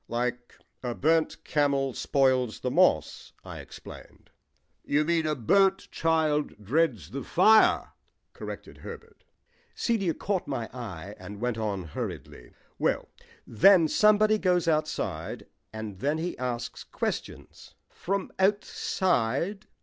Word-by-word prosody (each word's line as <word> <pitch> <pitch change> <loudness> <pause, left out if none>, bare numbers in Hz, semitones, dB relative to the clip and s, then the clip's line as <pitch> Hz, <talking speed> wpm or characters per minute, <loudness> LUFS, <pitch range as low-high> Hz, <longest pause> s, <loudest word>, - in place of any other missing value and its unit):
"Like 120 0 -3 0.3
'A 120 -2 -3
burnt 160 +1 +1
camel 140 -3 +1
spoils 130 -4 +1
the - - -1
moss,'" - - +2
I - - -8
explained. - - -12 0.5
"You 150 +1 +1
mean 165 -1 +1
'A 155 - 0
burnt 195 - +2
child 155 -2 +1
dreads 115 - 0
the 135 +1 -5
fire,'" 215 - +4 0.4
corrected - - -8
Herbert. - - -11 0.5
Celia 195 -8 0
caught 195 -3 -2
my 120 -5 -3
eye 100 -6 -7
and 105 0 -9
went 120 -1 -2
on 100 -4 -2
hurriedly, 75 - -7 0.3
"Well, - - 0 0.4
then 170 - +5
somebody 215 +4 +4
goes 180 -3 +2
outside, 155 -1 -2 0.3
and 110 -3 -7
then 145 +7 0
he 170 +2 -3
asks 125 -2 -4
questions - - -6
" - - -49 0.2
"From 195 +1 -1
outside?" 190 - 0
145 Hz, 120 wpm, -27 LUFS, 115-180 Hz, 0.5 s, then